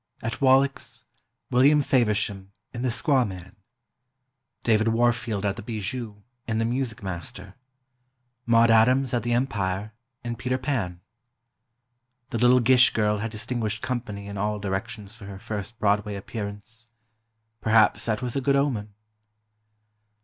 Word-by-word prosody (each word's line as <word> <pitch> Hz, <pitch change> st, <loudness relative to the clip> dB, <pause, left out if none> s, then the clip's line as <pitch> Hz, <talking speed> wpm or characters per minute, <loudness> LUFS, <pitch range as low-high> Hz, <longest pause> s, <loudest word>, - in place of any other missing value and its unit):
At 115 Hz, +4 st, -4 dB
Wallack's, 135 Hz, +1 st, +2 dB, 0.5 s
William 140 Hz, +4 st, +5 dB
Faversham, 105 Hz, -6 st, 0 dB, 0.2 s
in 120 Hz, -, -5 dB
"The 130 Hz, -, 0 dB
Squaw 130 Hz, +3 st, +2 dB
Man"; 95 Hz, -4 st, -8 dB, 1.1 s
David 110 Hz, -1 st, +3 dB
Warfield 115 Hz, -2 st, +1 dB
at 100 Hz, -, -1 dB
the -, -, -6 dB
Bijou, 110 Hz, 0 st, -5 dB, 0.2 s
in 110 Hz, -2 st, -1 dB
"The 115 Hz, -, +1 dB
Music 120 Hz, -2 st, -2 dB
Master"; 95 Hz, +1 st, -6 dB, 0.9 s
Maude 115 Hz, 0 st, +5 dB
Adams 125 Hz, +4 st, +4 dB
at 120 Hz, -, +1 dB
the 120 Hz, 0 st, -1 dB
Empire, 105 Hz, -5 st, -1 dB, 0.3 s
in 120 Hz, -1 st, -3 dB
"Peter 130 Hz, 0 st, -1 dB
Pan." 115 Hz, -10 st, -2 dB, 1.3 s
The 115 Hz, -, -2 dB
little 125 Hz, +1 st, +5 dB
Gish 130 Hz, +1 st, +6 dB
girl 105 Hz, -1 st, +1 dB
had 115 Hz, +2 st, -3 dB
distinguished 110 Hz, -1 st, -3 dB
company 110 Hz, -5 st, -4 dB
in 100 Hz, 0 st, -6 dB
all 105 Hz, +1 st, -1 dB
directions 105 Hz, +2 st, -5 dB
for 110 Hz, -3 st, -11 dB
her 100 Hz, -1 st, -8 dB
first 105 Hz, +3 st, -6 dB
Broadway 105 Hz, -1 st, +1 dB
appearance. 105 Hz, +2 st, -7 dB, 0.7 s
Perhaps 110 Hz, -1 st, +3 dB
that 110 Hz, +2 st, -1 dB
was 125 Hz, -2 st, -3 dB
a 135 Hz, -, 0 dB
good 140 Hz, +1 st, +2 dB
omen. 115 Hz, -8 st, -1 dB
115 Hz, 135 wpm, -25 LUFS, 105-125 Hz, 1.3 s, Gish